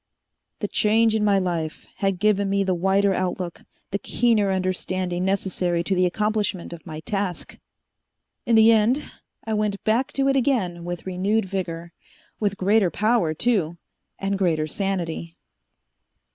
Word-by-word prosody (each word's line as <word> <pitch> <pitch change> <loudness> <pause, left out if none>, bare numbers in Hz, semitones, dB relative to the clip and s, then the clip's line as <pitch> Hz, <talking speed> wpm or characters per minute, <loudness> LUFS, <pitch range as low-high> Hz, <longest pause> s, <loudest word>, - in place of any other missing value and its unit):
The - - 0
change 220 +1 +3
in 220 -1 +1
my 205 -1 +4
life 170 -4 -2
had 195 -2 0
given 200 0 +2
me 200 0 +2
the 190 -1 +1
wider 195 +3 +2
outlook, 180 -2 -3 0.3
the 200 - -1
keener 220 -5 +2
understanding 185 -1 -1
necessary 185 -3 0
to 190 - -1
the 180 -1 +3
accomplishment 210 -2 -1
of 170 +1 -11
my 155 -1 -6
task. 195 -3 -4 0.9
In 235 - +4
the 220 +1 +7
end, 230 +6 +3 0.4
I 220 - -2
went 210 -1 -1
back 230 +5 +1
to 275 0 +1
it 275 - +3
again 210 -11 0
with 175 -1 -5
renewed 195 +4 0
vigor. 170 -3 -4 0.5
With 200 -2 0
greater 200 0 +3
power, 210 -5 +1
too, 175 -5 0 0.4
and 195 0 -2
greater 165 -5 +1
sanity." 170 -2 -3
195 Hz, 145 wpm, -24 LUFS, 175-215 Hz, 0.9 s, the